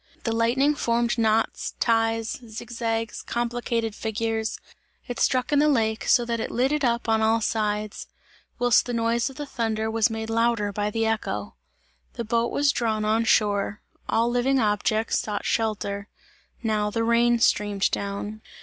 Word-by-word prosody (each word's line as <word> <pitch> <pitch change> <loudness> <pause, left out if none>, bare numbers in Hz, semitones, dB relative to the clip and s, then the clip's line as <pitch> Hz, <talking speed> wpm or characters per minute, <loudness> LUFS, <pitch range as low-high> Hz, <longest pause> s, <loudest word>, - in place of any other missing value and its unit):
The 230 - -1
lightning 240 +6 +2
formed 235 -3 0
knots, 220 0 +1
ties, 225 -1 +1
zigzags, 225 0 -3
complicated 235 -2 -2
figures; 220 0 -2 0.5
it 245 - -5
struck 255 +1 +1
in 290 - +5
the 300 - +4
lake, 220 -5 +1
so 240 - +4
that 235 -1 -2
it - - -3
lit 255 +4 +1
it 300 -1 0
up 235 -1 +1
on 220 -1 +2
all 220 +1 +3
sides; 210 -1 -2 0.5
whilst 245 -1 +3
the 245 - -3
noise 230 +2 +1
of 270 - -12
the 295 - -5
thunder 220 -4 -2
was 225 +1 +2
made 225 0 -4
louder 230 -2 +1
by 205 +1 -1
the 225 +1 -1
echo. 105 - -2 0.6
The 235 - -5
boat 230 +1 0
was 285 0 +3
drawn 220 -4 -1
on 220 +2 +2
shore; 205 -2 +1 0.3
all 230 +1 +2
living 245 +3 +2
objects 215 0 +1
sought 210 -1 -4
shelter. 200 -2 -1 0.6
Now 215 -2 +1
the 225 +2 -1
rain 235 +1 +3
streamed 205 -3 +2
down. 200 +2 -4
225 Hz, 160 wpm, -25 LUFS, 215-235 Hz, 0.6 s, in